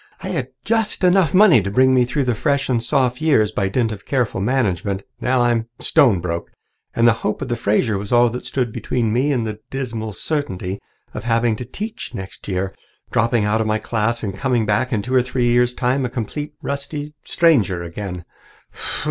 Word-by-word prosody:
"I - - -4
had - - -2 0.2
just 225 -4 0
enough 180 -3 +4
money 185 - +6
to 100 - -3
bring 130 +5 +4
me 125 -1 +4
through 135 +3 -1
the 125 -2 +1
Fresh 140 +4 0
and 120 -3 +1
Soph 125 +1 0
years 135 -10 +3
by 100 -2 -1
dint 115 +2 0
of 100 -2 -7
careful 125 -8 0
management. 100 -5 0 0.2
Now 130 0 +1
I'm 120 -1 +1
stone 115 -10 +4
broke, 85 -1 -3 0.5
and 115 0 +4
the 115 - +6
hope 105 - -1
of 135 - -5
the 120 - 0
Fraser 105 -1 +1
was 100 0 -6
all 120 0 +5
that 125 - -5
stood 125 -4 -2
between 115 -4 -1
me 135 +5 +2
and 120 -5 0
the 110 -1 -5
dismal 115 -5 -4
certainty 95 - -3 0.3
of - - -6
having 115 -1 +2
to 125 - -6
teach 215 - -6
next 95 0 -8
year, 95 0 -2 0.4
dropping 115 -1 +2
out 110 +2 +1
of 110 - -1
my 110 0 +1
class 115 +1 -1
and 100 -3 -3
coming 125 -1 0
back 105 +5 +1
in 105 -4 0
two 125 - -4
or 130 - +5
three 125 -1 -1
years' 125 0 +3
time, 130 +2 +1
a 125 - -1
complete, 145 +6 -5
rusty 145 +1 -4
stranger 115 - +2
again. 90 0 -6
120 Hz, 200 wpm, -20 LUFS, 105-130 Hz, 0.5 s, money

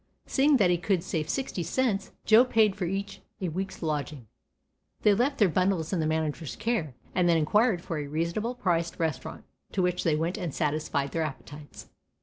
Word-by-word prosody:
Seeing 285 +1 +3
that 190 -6 +4
he 175 - +1
could 180 -1 0
save 160 -4 -3
sixty 265 -9 -2
cents, 200 +3 -1
Joe 225 +2 +7
paid 220 -5 +3
for 200 -3 -2
each 195 +2 -4 0.2
a 185 - -2
week's 185 +2 -5
lodging. 150 -4 -3 0.8
They 210 - +6
left 255 +7 +1
their 205 - +5
bundles 185 -1 0
in 180 - +1
the 155 - +1
manager's 155 -1 -2
care, 175 - -2 0.2
and 180 -1 +2
then 165 - +4
inquired 190 +4 +2
for 165 -5 -3
a 145 - -4
reasonable 170 - -2
priced 170 -6 0
restaurant, 160 -4 -3 0.3
to 190 - +1
which 180 0 0
they 160 -3 +2
went 165 +6 -1
and 175 -6 -4
satisfied 150 -2 -1
their 165 - -1
appetites. 145 0 -7
175 Hz, 185 wpm, -28 LUFS, 155-205 Hz, 0.8 s, Joe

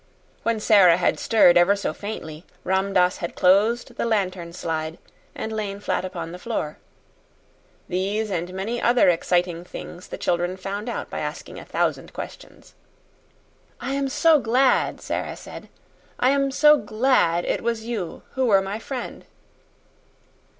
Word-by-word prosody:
When 230 -1 0
Sara 195 -6 +6
had 180 - +1
stirred 180 -6 +5
ever 185 +4 +4
so 200 - -3
faintly, 165 -7 -7 0.2
Ram 190 +1 0
Dass 180 -1 +3
had 170 - -5
closed 205 +6 +2
the - - -1
lantern 185 -6 -1
slide 160 -2 -4 0.4
and 220 - -4
lain 205 -2 -3
flat 205 - -1
upon 185 -3 -5
the 180 - -8
floor. 180 -9 -3 1.1
These 200 +4 -1
and 175 -1 -2
many 205 +6 -3
other 240 -4 +4
exciting 175 0 0
things 180 0 -9
the - - -7
children 175 +1 -1
found 200 +4 -5
out - - -5
by - - -4
asking - - -6
a - - -11
thousand - - -2
questions. - - -10 1.1
"I 250 +3 -3
am 275 -1 -1
so 300 +3 +4
glad," 255 +2 +2
Sara - - -3
said. - - -11 0.5
"I 255 - +4
am 275 0 +2
so 300 +2 +6
GLAD 215 -7 +1
it - - -1
was 230 -1 -2
you 215 -8 -4
who 260 -1 0
were 195 -3 +4
my 200 +3 -4
friend!" 250 +1 -6
200 Hz, 150 wpm, -23 LUFS, 180-235 Hz, 1.1 s, Sara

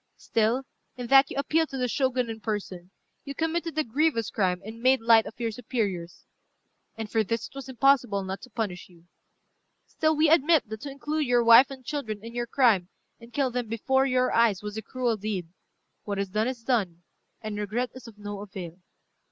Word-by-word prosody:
Still, 230 +4 0 0.3
in 245 - -5
that 270 0 +7
you - - -6
appealed 315 +3 +1
to 270 - -5
the 250 -1 0
Shogun 255 -1 0
in 225 -1 -6
person, 195 -5 -5 0.3
you 280 0 -7
committed 330 +1 -2
a 310 - +3
grievous 260 -3 0
crime, 185 -4 0
and 225 +2 -9
made 260 +2 +4
light 225 -1 +5
of 225 - -11
your 230 -1 -1
superiors; 210 -7 -4 0.7
and 220 -1 -4
for 220 +1 +1
this 230 +2 -2
it - - -23
was 275 -1 -8
impossible 250 -6 +2
not 190 +1 -5
to 250 - -12
punish 215 -7 -4
you. 170 -2 -20 0.8
Still 315 0 0
we 310 +1 +4
admit 315 -3 +4
that 220 0 -6
to 290 - -6
include 295 +2 -2
your 245 -1 +3
wife 235 +3 +8
and 265 -2 -10
children 225 -6 -4
in 230 - -8
your 240 0 -3
crime, 225 -9 +3 0.3
and 235 0 -14
kill 270 0 0
them 245 -1 -2
before 265 +5 +1
your 255 -1 +2
eyes, 220 -4 +3
was 210 0 -5
a 220 - -3
cruel 240 0 -1
deed. 195 -5 -4 0.5
What 205 -1 -4
is 200 -1 -2
done, 215 +4 0
is 250 -3 -5
done, 195 -9 -1 0.4
and 210 -1 -4
regret 220 +4 -2
is 255 -1 -11
of 220 -2 -13
no 205 -1 -6
avail. 190 -4 -8
230 Hz, 200 wpm, -27 LUFS, 210-265 Hz, 0.8 s, wife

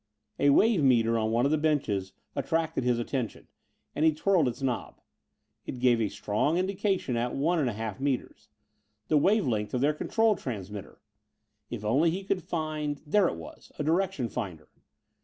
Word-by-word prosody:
A 145 - +4
wave 200 +3 +4
meter 115 -3 +4
on 110 0 0
one 120 +3 +2
of 140 - +2
the 155 - +2
benches 110 -12 0 0.2
attracted 160 -3 -1
his 125 -1 +2
attention 120 -1 -3 0.5
and 150 - 0
he 160 - +6
twirled 160 0 +2
its 125 +2 -4
knob. 125 -3 -2 0.7
It - - -4
gave 120 -4 +2
strong 125 +10 0
indication 190 - 0
at 120 +1 -1
one 165 +5 +1
and 135 -5 +1
a - - -3
half 110 0 -5
meters. 130 -5 -3 0.6
The 155 - +4
wave 205 +6 +3
length 105 -1 -1
of 125 - 0
their 145 +2 +3
control 220 +7 +2
transmitter! 105 - -7 0.7
If 105 - -6
only 140 +10 +3
he 185 +4 -3
could 190 -1 -1
find 155 -3 -2
but 150 +1 -19
there 205 -3 +5
it - - -2
was: 80 -1 -11
a - - -2
direction 170 -4 0
finder. 85 -8 -6
140 Hz, 175 wpm, -28 LUFS, 115-165 Hz, 0.7 s, he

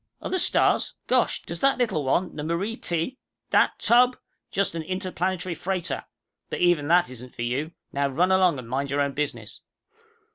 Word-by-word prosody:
"Other 375 - -1
stars? - - +2
Gosh! - - +1
Does - - -6
that 275 0 +3
little 215 - 0
one, 170 +7 0
the 150 - -4
Marie 170 +8 -1
T. 175 +7 -2
" - - -58
"That - - +3
tub? 250 +1 +4 0.3
Just 200 -3 +1
an 165 - -3
interplanetary 185 0 -2
freighter. 185 +1 -3 0.4
But - - -3
even 175 -5 +3
that 170 -5 +4
isn't 125 0 -10
for 120 - -4
you. 135 +7 -2 0.2
Now 140 0 +1
run 175 +7 +2
along 185 -5 +4
and 125 -3 -8
mind 135 +3 -2
your 140 +1 +1
own 140 0 +1
business." 145 +1 -4
170 Hz, 180 wpm, -25 LUFS, 140-190 Hz, 0.4 s, tub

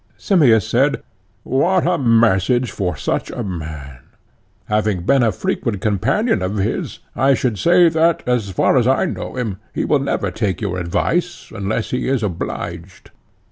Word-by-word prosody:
Simmias 120 - +3
said: 130 +6 +1 0.4
What 175 +7 +1
a 175 0 +1
message 115 0 +2
for 90 -6 -3
such - - -2
a - - -5
man! 80 -8 -7 0.7
having 105 -4 0
been 135 +7 +3
a 115 -2 +3
frequent 95 +1 -2
companion 105 - 0
of 95 +3 -2
his 95 - -2 0.2
I 135 +1 +3
should 120 -7 -2
say 175 0 +5
that, 165 0 +2
as 120 -5 0
far 95 +7 +2
as 120 -1 +3
I 135 +8 +2
know 170 - -5
him, 110 -6 -3 0.2
he - - -1
will 145 - +2
never 120 -8 -2
take 100 -1 -2
your 95 -4 -3
advice 170 - -2
unless 100 +3 -3
he 125 - -1
is 130 -4 0
obliged. 90 -1 -5
115 Hz, 160 wpm, -19 LUFS, 95-135 Hz, 0.7 s, say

